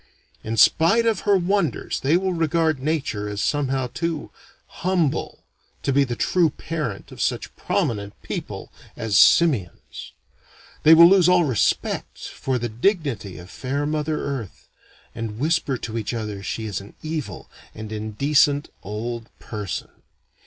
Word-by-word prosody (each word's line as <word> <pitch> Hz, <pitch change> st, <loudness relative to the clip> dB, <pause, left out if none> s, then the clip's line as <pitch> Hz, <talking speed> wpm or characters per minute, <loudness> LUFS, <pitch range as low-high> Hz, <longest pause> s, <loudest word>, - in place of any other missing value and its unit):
In 115 Hz, +1 st, -3 dB
spite 170 Hz, -, +5 dB
of 225 Hz, -4 st, +2 dB
her 200 Hz, -, +6 dB
wonders 180 Hz, -, 0 dB
they 150 Hz, +5 st, +3 dB
will 190 Hz, 0 st, -1 dB
regard 165 Hz, -2 st, +1 dB
Nature 135 Hz, -8 st, -2 dB
as 105 Hz, -1 st, -4 dB
somehow 135 Hz, -1 st, 0 dB
too 160 Hz, +4 st, -4 dB, 0.3 s
humble 175 Hz, -6 st, -1 dB, 0.4 s
to 135 Hz, -, +1 dB
be 140 Hz, +1 st, +4 dB
the 120 Hz, -3 st, -3 dB
true 170 Hz, +6 st, +2 dB
parent 150 Hz, -9 st, -5 dB
of -, -, -8 dB
such -, -, -2 dB
prominent 100 Hz, -3 st, -2 dB
people -, -, -6 dB, 0.3 s
as 110 Hz, -3 st, -2 dB
simians. 125 Hz, -, +3 dB, 0.7 s
They 160 Hz, +1 st, +8 dB
will 170 Hz, +1 st, +10 dB
lose 180 Hz, -1 st, +5 dB
all 180 Hz, -1 st, +5 dB
respect 130 Hz, -9 st, 0 dB
for 130 Hz, -1 st, -3 dB
the 120 Hz, 0 st, -2 dB
dignity 120 Hz, -, -1 dB
of 90 Hz, +3 st, -11 dB
fair 140 Hz, +5 st, -2 dB
Mother 150 Hz, 0 st, -1 dB
Earth, 130 Hz, -8 st, -6 dB, 0.5 s
and 115 Hz, -2 st, -5 dB
whisper 150 Hz, -1 st, 0 dB
to 115 Hz, 0 st, -5 dB
each 110 Hz, +2 st, -3 dB
other 105 Hz, -3 st, -4 dB
she 110 Hz, +3 st, -4 dB
is 100 Hz, -3 st, -3 dB
an 100 Hz, -, -14 dB
evil 155 Hz, -1 st, -5 dB, 0.3 s
and 110 Hz, 0 st, -7 dB
indecent 140 Hz, +7 st, +1 dB
old 115 Hz, +3 st, -5 dB
person. 105 Hz, -6 st, -5 dB
135 Hz, 145 wpm, -23 LUFS, 110-160 Hz, 0.7 s, will